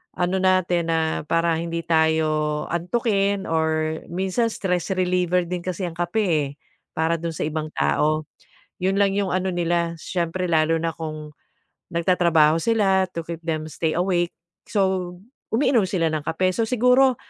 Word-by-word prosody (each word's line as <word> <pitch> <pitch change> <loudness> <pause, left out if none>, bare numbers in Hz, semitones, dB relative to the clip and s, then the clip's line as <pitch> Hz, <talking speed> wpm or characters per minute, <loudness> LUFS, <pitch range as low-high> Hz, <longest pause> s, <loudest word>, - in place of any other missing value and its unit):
ano 180 +1 0
natin 185 -2 +2
na 165 0 +2 0.3
para 165 +1 +2
hindi 170 0 -3
tayo 155 -2 +1
antukin 200 +2 0
or 160 -1 0
minsan 190 +6 0
stress 180 -5 -2
reliever 180 -1 +1
din 180 +1 -3
kasi 185 +1 -4
ang 175 - -4
kape, 175 +5 0
eh, 155 -6 +1 0.5
para 160 +1 +2
do'n 165 -1 -3
sa - - -2
ibang 155 0 -3
tao. 150 - +1 0.6
'Yon 190 +1 +1
lang 200 -1 +3
'yong 200 -2 0
ano 185 0 -1
nila, 170 -1 0
siyempre 180 +1 -2
lalo 165 0 +2
na 165 -1 -2
kung 155 -2 -6 0.6
nagtatrabaho 170 -3 +3
sila 195 -3 +3
to 170 - -5
keep 165 -1 -6
them 160 -2 -2
stay 160 +1 -1
awake. 175 -1 +1 0.4
So 190 -3 0 0.3
umiinom 235 -4 +2
sila 165 -4 +1
ng 155 - -1
kape. 185 +3 +1
So 225 +4 0
siguro, 250 +2 +4
175 Hz, 155 wpm, -23 LUFS, 160-190 Hz, 0.6 s, siguro